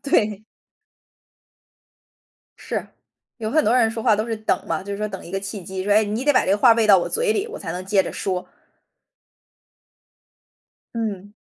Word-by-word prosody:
对。 215 -7 +1 2.2
是， - - -4 0.5
有 220 -2 -3
很 310 +3 +3
多 230 - +3
人 230 -3 +4
说 225 0 -5
话 220 -3 +4
都 215 +2 -1
是 225 -1 -2
等 215 - -1
嘛， 165 +1 -2
就 200 +1 -6
是 200 - -4
说 210 - -1
等 190 -1 -8
一 - - -10
个 195 - -1
契 195 0 -6
机， 190 +1 -5
说， 205 - +2
哎， 215 +1 +5
你 215 +5 -3
得 290 - +4
把 255 - +3
这 - - 0
个 200 - +3
话 235 +1 +7
喂 225 -1 +2
到 195 -3 +7
我 - - -2
嘴 465 -1 +1
里， 425 0 -1
我 - - -7
才 165 -4 -5
能 180 +1 -5
接 195 0 +3
着 - - -6
说。 185 -2 -3 2.5
嗯。 205 -3 -4
210 Hz, 210 characters per minute, -22 LUFS, 195-230 Hz, 2.5 s, 话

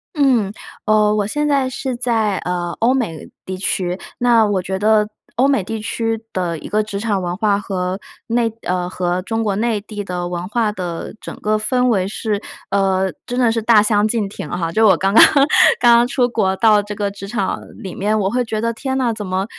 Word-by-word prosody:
嗯， 255 -9 +2 0.3
呃， 210 -1 +3
我 205 -2 0
现 295 +7 -1
在 275 -3 +1
是 260 -1 -4
在 225 -5 0
呃， 175 -1 -3
欧 240 +3 +3
美 180 - -3 0.2
地 185 - -4
区， 185 -1 -1 0.2
那 235 -2 +4
我 205 -3 0
觉 190 +1 -4
得 210 0 +3 0.3
欧 255 +4 +3
美 275 -8 +2
地 220 +4 -4
区 225 +1 -2
的 175 -3 -2
一 - - -9
个 215 +1 +1
职 205 -2 -5
场 205 -3 -1
文 175 0 -3
化， 205 -2 +2
和 185 -1 -3 0.3
内 230 -1 +1
呃， 180 0 -1
和 180 0 -1
中 225 +4 -2
国 200 -2 0
内 225 -1 0
地 205 -1 -7
的 180 -2 -4
文 175 0 -4
化 220 +1 0
的 175 -5 -5
整 - - -7
个 215 0 +1
氛 250 +3 +1
围 190 -5 +1
是， 210 0 -3 0.3
呃， 190 -1 +1 0.2
真 245 +1 -2
的 240 -3 +3
是 225 0 -1
大 220 -1 +5
相 210 0 +2
径 220 -2 -1
庭 195 -6 -8
哈， 170 -2 -2
就 220 +5 +4
我 - - +5
刚 195 +1 0
刚 - - +9 0.6
刚 235 -1 +6
刚 240 - +2
出 250 0 +1
国， 205 -5 0
到 215 -1 +4
这 210 +1 -7
个 205 -1 -2
职 195 0 -9
场 200 -3 -2 0.2
里 190 - -7
面 210 +2 0
我 190 -2 +1
会 250 0 +1
觉 220 -2 -3
得， 230 +1 -1
天 265 +3 -3
哪， 245 -3 +1
怎 215 -2 -6
么 185 +1 -1
210 Hz, 235 characters per minute, -19 LUFS, 190-230 Hz, 0.6 s, 刚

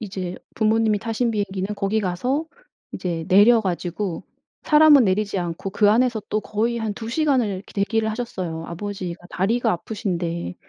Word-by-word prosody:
이제 190 -4 -5 0.2
부모님이 220 -1 +2
타신 230 +2 -1
비행기는 200 -1 -2
거기 200 +2 0
가서 245 - -1 0.5
이제 165 -3 -3
내려 215 +5 +6
가지고 180 -1 -3 0.4
사람은 300 -3 +6
내리지 200 0 0
않고 175 +2 -4
그 205 +1 +3
안에서 235 0 +2
또 215 - 0
거의 230 +3 -1
한 220 -2 -2
2 225 +2 -7
시간을 270 -3 +2
이렇게 195 0 -7
대기를 220 +2 0
하셨어요. 185 -8 -4
아버지가 180 -1 -6
다리가 225 +5 +1
아프신데. 170 - -3
205 Hz, 355 characters per minute, -22 LUFS, 185-225 Hz, 0.5 s, 내려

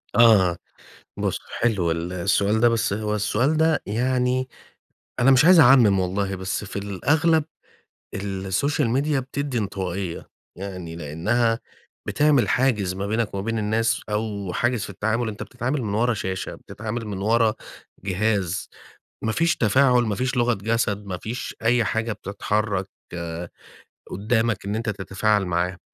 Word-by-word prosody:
آه، 105 -6 +6 0.6
بُص - - -1 0.2
حلو 100 -8 +1
ال 85 +2 -2
السؤال 100 +4 +1
ده، 120 - +6
بس 115 -3 0
هو 105 +1 -1
السؤال 115 +8 +1
ده 160 0 +2
يعني 125 +3 0 0.7
أنا 130 +2 +5
مش 135 +2 +6
عايز 180 0 +8
أعمِم 120 -8 +6
والله 95 +1 -1
بس 95 +2 -3
في 100 - -9
الأغلب 145 - +2 0.7
السوشيال 100 +8 -1
ميديا 140 +3 +1
بتدّي 135 0 -3
انطوائية، 95 -3 -4 0.3
يعني 90 -4 -6
لأنها 110 +10 0 0.5
بِتعمل 145 -4 +3
حاجز 110 -8 +1
ما 95 +1 -3
بينَك 110 0 -1
و - - -2
ما 95 - -2
بين 115 +2 -2
الناس 110 +2 +1
أو 105 -3 -3
حاجز 120 +2 0
في - - -7
التعامل، 110 +4 -1
أنت 105 -1 -6
بتتعامل 130 +3 -3
من 105 -2 -2
ورا 120 +2 +2
شاشة، 95 -2 -4
بتتعامل 110 +2 -6
من 100 -2 -4
ورا 110 +2 +2 0.5
جهاز، 95 -1 -1 0.6
ما 110 - +1
فيش 165 +6 +2
تفاعل، 125 +3 +4
ما 110 -3 -1
فيش 125 +3 -1
لغة 120 0 +3
جسد، 105 -1 -1
ما 95 -2 -3
فيش 120 +6 -5
أي 120 +1 +3
حاجة 110 +1 -1
بتتحرك 100 -1 -2 1.2
قدامَك 110 +1 0
إن 100 +2 -1
أنت 115 0 -2
تتفاعل 100 +1 0
معاه، 90 +1 -1
110 Hz, 145 wpm, -23 LUFS, 100-120 Hz, 1.2 s, عايز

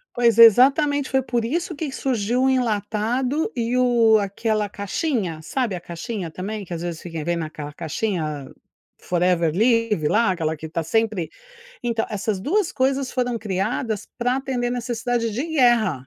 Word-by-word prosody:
Pois, 235 -2 +3
exatamente. 275 +5 +6
Foi 265 -1 +1
por 240 -3 -1
isso 335 +8 -2
que 295 -1 -4
surgiu 250 -2 0
o 265 - +4
enlatado 245 - 0
e 235 0 -1
o 235 -3 +4
aquela 210 +1 -1
caixinha. 200 - -2
Sabe, 235 - -2
a 175 - -5
caixinha 175 +2 -5
também 200 +6 -5
que 180 - -15
às 170 -1 -4
vezes 170 -2 -4
fica 165 -3 -6
vem 175 0 0
naquela 155 -3 -6
caixinha: 170 +3 -2
a 145 -3 -5 0.6
Forever 175 -2 +1
Living 225 -6 +2
lá, 225 +5 +3
aquela 160 -3 -1
que 160 +1 -8
está 165 +1 -3
sempre 210 -1 0 0.5
então, 235 -2 -1
essas 210 -2 -2
2 365 - 0
coisas 265 0 0
foram 245 -2 -1
criadas 215 +2 -2
para 245 +1 +1
atender 255 -3 -2
necessidade 240 -1 -1
de 240 +7 -2
guerra. 240 - +3
225 Hz, 160 wpm, -22 LUFS, 185-250 Hz, 0.6 s, exatamente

